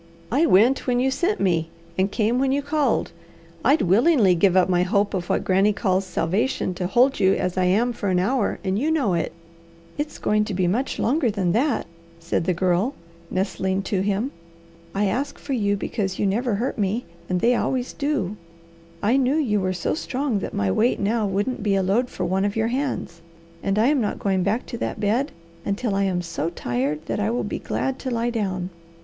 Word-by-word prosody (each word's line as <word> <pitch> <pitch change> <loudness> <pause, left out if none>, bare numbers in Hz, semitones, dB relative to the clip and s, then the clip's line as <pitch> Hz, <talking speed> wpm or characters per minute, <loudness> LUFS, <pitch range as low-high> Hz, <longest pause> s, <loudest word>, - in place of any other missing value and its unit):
I 295 +7 +3
went 235 +10 +4
when 245 -1 +2
you 265 +1 +2
sent 365 +9 0
me, 165 -4 +1 0.3
and 190 +1 +1
came 230 +3 +1
when 265 0 +2
you 280 +1 0
called. 295 0 0 0.5
I'd 290 +2 +4
willingly 215 - +4
give 185 +1 +3
up 185 - +5
my 180 -1 +2
hope 200 +2 +1
of 180 -2 -3
what - - +1
Granny 195 +3 +3
calls 190 -2 0
'salvation' 185 +4 -1
to 180 0 -3
hold 250 +7 +3
you 190 -1 +4
as 180 -1 -2
I 185 -1 +2
am 225 +7 +2
for 205 -3 -3
an 185 - +2
hour, 220 +6 +1
and 190 +1 0
you 295 +6 0
know 280 - +1
it." 170 -2 -1 0.7
"It's 295 0 -3
going 210 0 +1
to 205 - -4
be 185 0 +1
much 230 +10 0
longer 260 +1 +1
than 195 -4 0
that," 245 - +1 0.3
said 165 0 -1
the 185 - +2
Girl 185 +9 +1 0.3
nestling 190 0 -1
to 195 -2 -1
him. 205 +7 0 0.6
"I 205 +1 +2
asked 255 +9 -1
for 280 - -5
you 205 -4 +1
because 195 -2 -3
you - - 0
never 220 +3 +1
hurt 235 +3 -2
me, 210 +4 0 0.2
and 180 -1 +1
they 235 +6 +3
always 250 +1 -1
do. 280 -9 -1 0.7
I 230 +6 +3
knew 270 +1 +2
you 240 -10 +1
were 185 -1 0
so 180 -2 -1
strong 270 -7 -1
that - - -5
my 100 -1 0
weight 235 - +2
now 215 +1 +1
wouldn't 205 +7 -1
be 200 -1 +1
a 195 - +2
load 225 +7 +1
for 185 - -3
one 190 +2 0
of 205 0 -1
your 225 0 +1
hands, 255 -10 -3 0.4
and 195 +1 0
I 220 - +4
am 290 -3 +2
not 210 - -1
going 190 -2 0
back 205 +6 0
to 235 - -7
that - - -3
bed 230 +8 +1 0.3
until 205 +2 -1
I 195 0 +1
am 180 -2 -1
so 165 -2 -3
tired 145 0 -2
that - - -2
I 210 +1 +1
will 240 +2 -1
be - - -3
glad 265 0 -2
to 260 - -4
lie 235 0 0
down." 190 -5 -2
205 Hz, 215 wpm, -23 LUFS, 185-250 Hz, 0.7 s, up